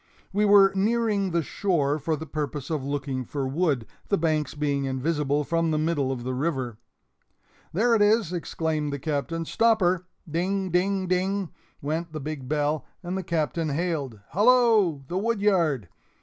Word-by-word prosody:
We 210 +2 +2
were 200 -1 +7
nearing 210 -1 +1
the 170 -1 0
shore 150 -4 0
for 155 +2 -1
the 160 - -7
purpose 150 -1 -4
of 150 -4 -1
looking 140 -2 -2
for 135 +2 -3
wood, 140 -4 0 0.2
the 200 - +3
banks 155 -4 0
being 145 -2 0
invisible 145 +2 0
from 165 +2 0
the 155 - +1
middle 150 -4 0
of 125 -2 -4
the 130 +1 -2
river. 130 -5 -2 0.9
"There 225 +8 +2
it 220 - +3
is!" 205 -4 +3
exclaimed 160 -3 -2
the 140 - -2
Captain; 155 +3 -2
"stop 225 +5 +3
her!" 180 -1 +1 0.2
Ding 185 +4 -1
ding 190 +2 +1
ding! 185 +1 0 0.3
went 160 +3 -2
the 155 - -4
big 145 -3 -6
bell, 150 -1 0 0.2
and 180 +1 -3
the 190 - -1
Captain 165 -1 -1
hailed: 145 - -2
"Hallo! 215 - +4
the 180 +5 -1
woodyard!" 190 - +1
160 Hz, 165 wpm, -26 LUFS, 145-190 Hz, 0.9 s, were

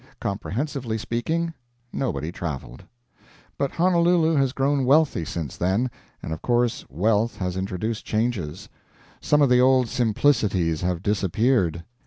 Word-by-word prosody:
Comprehensively 115 +4 -3
speaking, 160 +9 -2 0.4
nobody 80 - -2
traveled. 75 -3 -6 0.7
But 140 - -2
Honolulu 170 -2 +3
has 135 -3 +2
grown 140 +1 +1
wealthy 140 - +3
since 80 -4 -5
then, 100 +8 0 0.3
and 80 - -4
of 80 - -7
course 120 -1 +1
wealth 105 - +1
has 90 -1 -3
introduced 95 +4 -3
changes; 105 -8 -2 0.5
some 150 0 +3
of 140 - +4
the 125 0 +5
old 130 -2 +4
simplicities 110 - +1
have 90 0 -1
disappeared. 100 -3 +1
115 Hz, 125 wpm, -24 LUFS, 90-135 Hz, 0.7 s, the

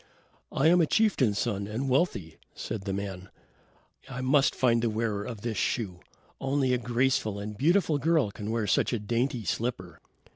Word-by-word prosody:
"I 135 - 0
am 175 +2 +6
a 160 - +3
chieftain's 145 - +2
son, 100 -4 -1
and 115 +6 -3
wealthy," 125 - 0 0.2
said 95 -3 -5
the 100 - -2
man. 95 -1 -5 0.8
"I 125 -1 -5
must 135 +2 +3
find 120 -2 +3
the 115 - +1
wearer 110 -2 -1
of 110 -2 -7
this 115 -2 -3
shoe. 95 -8 -1 0.4
Only 135 -1 +1
a 125 - +1
graceful 120 -3 0
and 105 +1 -6
beautiful 160 - +2
girl 155 -6 +2
can 105 +1 -6
wear 115 -1 0
such 100 - +1
a 120 - 0
dainty 120 +3 -1
slipper." 95 -6 -3
115 Hz, 175 wpm, -28 LUFS, 105-135 Hz, 0.8 s, am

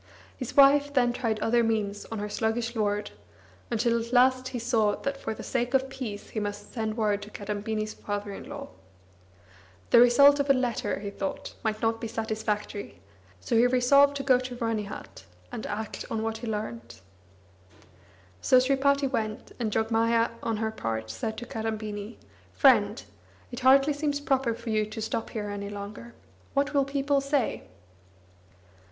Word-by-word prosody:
His 255 0 -7
wife, 285 +1 +6
then, 245 -2 +3
tried 225 -3 -1
other 235 +1 +3
means 210 -3 -1
of 225 - -6
her 210 0 -3
sluggish 225 +3 -1
lord, 210 -1 -1 0.6
until 235 0 +1
at 235 - -10
last 255 +1 +4
he 255 - -4
saw 225 -3 +1
that 275 0 -3
for 220 -5 -5
the - - -8
sake 245 +1 -1
of 265 0 +1
peace 220 -7 -6
he 220 - -3
must 205 0 -5
send 220 -2 -3
word 210 -2 +1
to 205 - -9
Kadambini's 215 +1 -3
father 205 0 -5
in - - -9
law. - - -7 1.2
The - - +8
result 280 +4 +7
of 280 0 0
a - - +8
letter, 250 -2 -1
he 200 -1 -5
thought, 195 -1 -5
might 215 -1 -2
not 225 0 +1
be 230 - -3
satisfactory; 215 -2 -3 0.4
so 230 - -2
he 235 +2 +6
resolved 280 +3 +4
to 275 - -4
go 260 -2 +4
to 255 -1 -6
Ranihat, 225 -4 -4 0.3
and 240 -3 -5
act 215 +1 -5
on 220 -1 -2
what 225 0 -3
he 240 - -6
learnt. 120 - -5 1.4
So 255 - +5
Sripati 275 +2 +3
went, 220 -4 -3
and 225 -3 -1
Jogmaya 230 +1 +2
on 225 -2 -1
her 220 0 -1
part 110 - -4
said 220 - -4
to 240 - -6
Kadambini 220 -3 -5 0.4
"Friend, - - +4 0.5
it 245 - -5
hardly 270 +3 +5
seems 290 0 -1
proper 265 -5 0
for 230 0 -6
you 215 0 +2
to 215 +1 -7
stop 220 +1 -3
here 210 -2 -4
any 200 0 -5
longer. 205 +3 -8 0.4
What 285 +1 +1
will 280 -1 +3
people 280 0 +1
say?" 275 - -1
225 Hz, 170 wpm, -27 LUFS, 215-255 Hz, 1.4 s, The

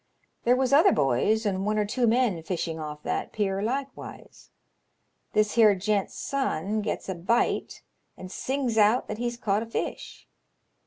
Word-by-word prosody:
" - - -43
There 245 +1 +5
was 260 +1 +1
other 330 +7 +6
boys 175 - +1
and 190 -2 0
one 210 +1 0
or 210 - +2
two 240 +4 0
men 225 -7 +2
fishing 165 -2 -3
off 150 -1 -7
that - - -2
pier 195 -2 -1
likewise. 270 +6 -6 0.8
This 215 0 +2
here 215 -3 +6
gent's 200 +1 -1
son 215 - -2
gets 210 - -4
a 190 - -2
bite, 185 +7 -1 0.3
and 185 0 -9
sings 260 -3 -1
out 215 +4 +4
that 215 - -5
he's 240 0 -2
caught 210 -3 0
a 230 - -5
fish. 230 - -5
215 Hz, 165 wpm, -26 LUFS, 195-240 Hz, 0.8 s, other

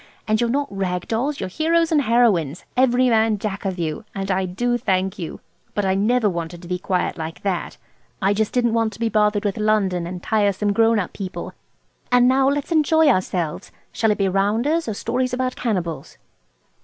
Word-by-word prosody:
And 215 +1 +2
you're 235 - +1
not 280 -3 -1
rag 180 -2 -2
dolls. 270 +6 -1
You're - - -3
heroes 330 - +1
and 305 -2 +4
heroines, 215 - +2
every 255 0 +3
man 220 -2 +3
jack 200 -1 -4
of 190 -1 -2
you. 160 +3 -3
And 195 0 -2
I 190 0 +1
do 240 +7 -1
thank 190 -4 -1
you. 165 - -6 0.3
But 205 - 0
I 190 - +2
never 215 +4 +2
wanted 170 -1 -4
to - - -9
be 180 0 -2
quiet 180 -2 -1
like 160 +1 -6
that. 190 -3 -2 0.4
I 200 -1 +2
just 215 +1 0
didn't 240 -2 +1
want 225 -1 +1
to - - -13
be 230 -1 0
bothered 210 -1 +1
with 200 - -1
London 200 -5 +1
and 180 0 -7
tiresome 205 -1 +1
grown 225 +1 +3
up 190 -4 -2
people. 190 -2 -6 0.6
And 245 0 +5
now 265 +1 +4
let's 285 +3 -2
enjoy 320 -1 +4
ourselves! 180 - -1 0.2
Shall 220 - +1
it 210 - +1
be 195 - +1
rounders, 225 - +1
or 220 - -2
stories 255 +4 -1
about 255 0 -1
cannibals?" 180 -9 -3
210 Hz, 195 wpm, -22 LUFS, 185-245 Hz, 0.6 s, And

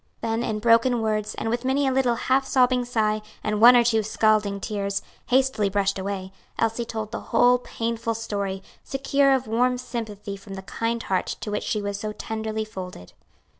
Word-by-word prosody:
Then, 225 0 -1
in 215 -2 -1
broken 230 +2 +4
words, 215 -1 -1
and - - -4
with 235 +2 -1
many 270 +2 +1
a 265 - +2
little 255 -2 +2
half 260 +3 +1
sobbing 250 -2 +3
sigh 215 -3 0 0.2
and 210 0 -1
one 245 +2 +9
or 240 - +6
two 225 -2 +2
scalding 215 -1 +1
tears, 200 -1 -2 0.2
hastily 260 -5 +2
brushed 200 0 0
away, 190 -1 -4 0.3
Elsie 225 +1 0
told 220 -2 -5
the 230 - -4
whole 245 +1 +5
painful 230 -1 -3
story, 200 -3 -3 0.2
secure 275 +1 +2
of 260 -1 +2
warm 250 +3 +1
sympathy 220 -5 -5
from 195 0 -10
the 190 - -7
kind 230 +5 -2
heart 190 -1 0
to 210 - -4
which 210 - -1
she 210 -2 -2
was 200 -1 -3
so 215 0 -4
tenderly 220 0 -4
folded. 180 - -9
225 Hz, 185 wpm, -24 LUFS, 205-245 Hz, 0.3 s, one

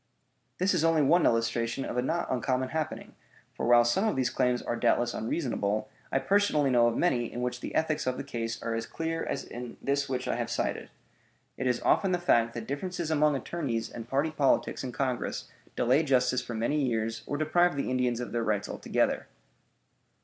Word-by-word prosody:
This 185 +2 +2
is 170 -3 +1
only 165 -2 +4
one 170 +5 +4
illustration 115 +2 0
of - - -4
a 125 - +2
not 165 +7 -1
uncommon 130 0 0
happening; 155 -1 -4 0.4
for, - - -3
while 120 0 +6
some 190 - +2
of 215 - 0
these 130 -2 +1
claims 125 -1 +1
are 120 - -2
doubtless 120 0 +2
unreasonable, 110 -4 -1 0.2
I - - +2
personally 150 -2 +2
know 120 -1 +5
of 115 - 0
many 120 -9 +1
in 120 - -4
which 125 0 -2
the - - -6
ethics 155 -3 0
of 130 - 0
the - - -4
case 115 -4 -4
are 115 - -2
as 115 0 -3
clear 165 0 -3
as 140 - -3
in 120 -1 -8
this 140 0 -1
which 130 -1 -2
I - - 0
have - - -2
cited. - - -2 0.7
It - - -2
is 125 -1 0
often 195 -2 +3
the - - +3
fact 115 -10 +2
that 115 -2 -5
differences 170 +4 -3
among 150 -1 +3
attorneys 130 -5 -3
and 115 0 -8
party 140 +4 +1
politics 140 -3 +1
in 130 - -4
Congress 130 -1 -2 0.3
delay 130 +5 +3
justice 125 -4 +2
for 120 -1 -6
many 130 +7 0
years 115 -2 -1
or 145 - -2
deprive 175 +2 +2
the 140 - -1
Indians 125 -2 +1
of 125 - -5
their 120 -1 -1
rights 105 -2 0
altogether. - - -1
130 Hz, 200 wpm, -29 LUFS, 120-155 Hz, 0.7 s, while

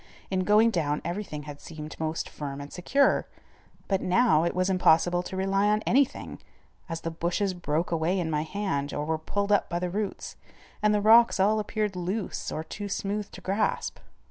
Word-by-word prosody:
In 185 -1 0
going 215 +3 +5
down 150 -6 0
everything 170 -4 -4
had 145 -1 -9
seemed 155 -1 -8
most 160 0 -2
firm 140 -2 -6
and 145 0 -9
secure, 275 +10 +2 0.6
but 195 -2 +1
now 185 -4 +3
it 170 - -1
was 185 0 +1
impossible 175 -1 +3
to 190 +1 -6
rely 195 +1 +2
on 210 +1 +2
anything, 275 +2 0 0.5
as 165 0 -4
the 165 - -3
bushes 175 +4 -1
broke 170 -1 -2
away 170 +3 +1
in 165 -2 -2
my 150 -1 +1
hand 155 -5 -2
or 145 - -2
were 160 0 -1
pulled 200 +5 -2
out 205 - +3
by 170 - -1
the 175 0 -2
roots, 205 +1 -4 0.4
and 210 0 +4
the 210 -1 +2
rocks 225 +1 +6
all 210 +3 +3
appeared 210 -1 -2
loose 185 +4 -3
or 155 - -3
too 205 +5 -6
smooth 200 +1 -2
to - - -11
grasp. 200 +3 -1
185 Hz, 190 wpm, -27 LUFS, 160-205 Hz, 0.6 s, rocks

